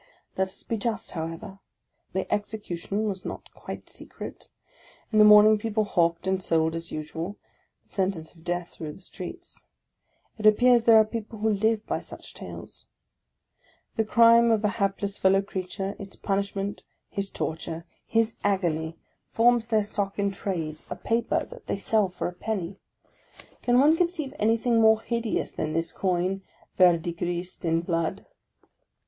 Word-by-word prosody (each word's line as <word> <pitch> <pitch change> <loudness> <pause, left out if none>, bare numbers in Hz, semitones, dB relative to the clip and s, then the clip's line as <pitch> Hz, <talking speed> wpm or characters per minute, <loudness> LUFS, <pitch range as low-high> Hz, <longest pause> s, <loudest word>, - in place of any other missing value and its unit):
Let 190 0 +1
us 190 - -8
be 230 - -2
just, 220 -1 -3
however; 165 +4 -6 0.5
the 190 0 -2
execution 205 -1 -3
was 190 -3 -3
not - - -7
quite - - -8
secret. - - -9 0.7
In 215 - +5
the 210 - +9
morning 210 0 +8
people 215 0 0
hawked 170 -4 +1
and 190 0 +1
sold, 160 -2 +2
as 165 0 -5
usual, 160 +5 -5 0.5
the - - -29
sen 190 -2 +2
tence 160 -5 -7
of 165 -2 -19
death 175 0 -2
through 155 -2 -7
the - - -14
streets. 190 - -8 0.7
It 215 - +4
appears 240 +2 +5
there 230 -1 +8
are 220 - +7
people 220 0 -6
who 220 +1 +1
live 220 +1 +1
by - - -1
such - - -11
sales. - - -10 1.1
The 220 - +2
crime 230 +1 +6
of 220 -2 +2
a - - +4
hapless 200 0 0
fellow 195 +1 +4
creature, 195 0 -4
its 195 -1 -9
punishment, 200 0 -2 0.3
his 200 0 -3
torture, 165 0 -4 0.2
his 225 0 +1
agony, 165 -5 0 0.3
forms 235 0 +3
their 220 -2 +3
M. - - -4
VICTOR 205 - -2
HUGO - - +4
33 195 0 -8
stock - - -31
in 200 -1 +1 0.3
trade 155 0 -8
— - - -30
a - - -3
paper 230 +1 0
that - - -13
they - - -1
sell 205 0 +2
for 180 - -3
a 180 - -5
penny. 195 -1 -4 0.8
Can 245 0 +3
one 300 +4 +6
corceive 335 -5 -1
anything 225 +2 +3
more 220 0 +6
hideous 235 -2 -1
than 155 0 -3
this 165 +1 -1
coin, 185 +1 0 0.4
verdigrised 175 0 +1
in 165 -1 +2
blood? 170 +2 -2
200 Hz, 165 wpm, -26 LUFS, 175-220 Hz, 1.1 s, the